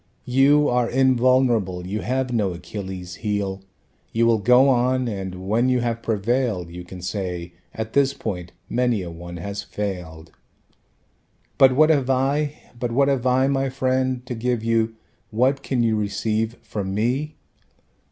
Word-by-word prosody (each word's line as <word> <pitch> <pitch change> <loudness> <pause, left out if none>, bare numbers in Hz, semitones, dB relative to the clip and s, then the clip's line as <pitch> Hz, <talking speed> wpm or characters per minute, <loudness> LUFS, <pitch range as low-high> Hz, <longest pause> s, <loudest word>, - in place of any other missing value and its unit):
You 140 +4 +4
are 125 -1 +1
invulnerable, 125 -7 +2
you 100 +3 -3
have 130 0 -1
no 100 -6 +1
Achilles' 95 0 -7
heel. 100 -3 -2 0.5
You 115 +1 +2
will 115 -1 +3
go 125 +5 +5
on, 130 0 +2
and 95 -3 -5
when 115 +5 +2
you 125 -1 +2
have 115 -1 -2
prevailed 110 -4 -1
You 90 +1 -8
can 90 0 -10
say: 90 -3 -4 0.2
at 110 0 -5
this 140 -1 +4
point 90 -2 -5 0.2
many 120 -5 0
a 85 - -6
one 85 +1 -8
has 100 +4 -5
failed. 90 -6 -6 1.3
But 130 -1 +7
what 155 +3 +5
have 135 -4 +1
I, 140 +3 +1 0.2
but 120 -1 -2
what 140 +3 +3
have 130 -2 0
I, 130 +1 +3
my 135 0 +1
friend, 130 -1 0
To 125 - -4
give 120 0 -1
you, 115 -1 +1 0.3
what 130 +5 +1
can 130 -3 0
you 110 -1 +2
receive 110 +2 -1
from 100 -3 -4
me? 130 +8 -1
115 Hz, 155 wpm, -23 LUFS, 100-130 Hz, 1.3 s, But